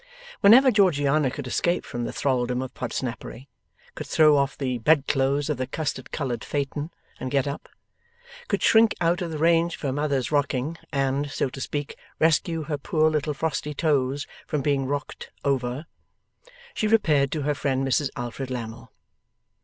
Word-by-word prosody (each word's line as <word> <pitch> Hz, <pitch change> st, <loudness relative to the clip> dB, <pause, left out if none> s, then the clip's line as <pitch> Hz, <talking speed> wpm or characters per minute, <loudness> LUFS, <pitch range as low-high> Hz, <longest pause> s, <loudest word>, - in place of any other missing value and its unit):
Whenever 250 Hz, +6 st, +7 dB
Georgiana 150 Hz, -, +3 dB
could 140 Hz, +1 st, -6 dB
escape 175 Hz, +7 st, 0 dB
from 120 Hz, 0 st, -4 dB
the -, -, -3 dB
thraldom 125 Hz, -2 st, 0 dB
of 130 Hz, -, -8 dB
Podsnappery; 125 Hz, +1 st, -5 dB, 0.5 s
could -, -, -7 dB
throw 155 Hz, -2 st, +5 dB
off 140 Hz, 0 st, +1 dB
the 130 Hz, -3 st, -2 dB
bedclothes 140 Hz, 0 st, +2 dB
of 150 Hz, -3 st, -1 dB
the 130 Hz, 0 st, -2 dB
custard 155 Hz, -2 st, -4 dB
coloured 125 Hz, -6 st, -3 dB
phaeton, 145 Hz, +2 st, -3 dB, 0.3 s
and 130 Hz, -, -4 dB
get 135 Hz, 0 st, +1 dB
up; 140 Hz, -, -6 dB, 0.8 s
could -, -, -1 dB
shrink 225 Hz, -1 st, +5 dB
out 175 Hz, +2 st, +1 dB
of 175 Hz, -, -2 dB
the 160 Hz, -, -4 dB
range 165 Hz, +2 st, +3 dB
of -, -, -16 dB
her 140 Hz, -, -1 dB
mother's 140 Hz, -4 st, -1 dB
rocking, 145 Hz, +1 st, 0 dB, 0.2 s
and 140 Hz, 0 st, 0 dB
(so 140 Hz, -, -1 dB
to 135 Hz, -, -8 dB
speak) 145 Hz, +1 st, -4 dB, 0.2 s
rescue 165 Hz, +1 st, +2 dB
her 150 Hz, -1 st, -3 dB
poor 155 Hz, 0 st, +2 dB
little 150 Hz, -1 st, -1 dB
frosty 150 Hz, 0 st, -2 dB
toes 140 Hz, -3 st, +1 dB, 0.2 s
from 150 Hz, -3 st, -1 dB
being 140 Hz, -2 st, +1 dB
rocked 145 Hz, +1 st, -4 dB, 0.2 s
over; 130 Hz, +1 st, -1 dB, 0.9 s
she 215 Hz, -, 0 dB
repaired 155 Hz, -11 st, +3 dB
to 155 Hz, -3 st, -2 dB
her 150 Hz, +1 st, +1 dB
friend, 135 Hz, -1 st, -1 dB
Mrs 135 Hz, +2 st, +1 dB
Alfred 120 Hz, +2 st, -5 dB
Lammle. 115 Hz, -1 st, -6 dB
145 Hz, 165 wpm, -25 LUFS, 130-155 Hz, 0.9 s, Whenever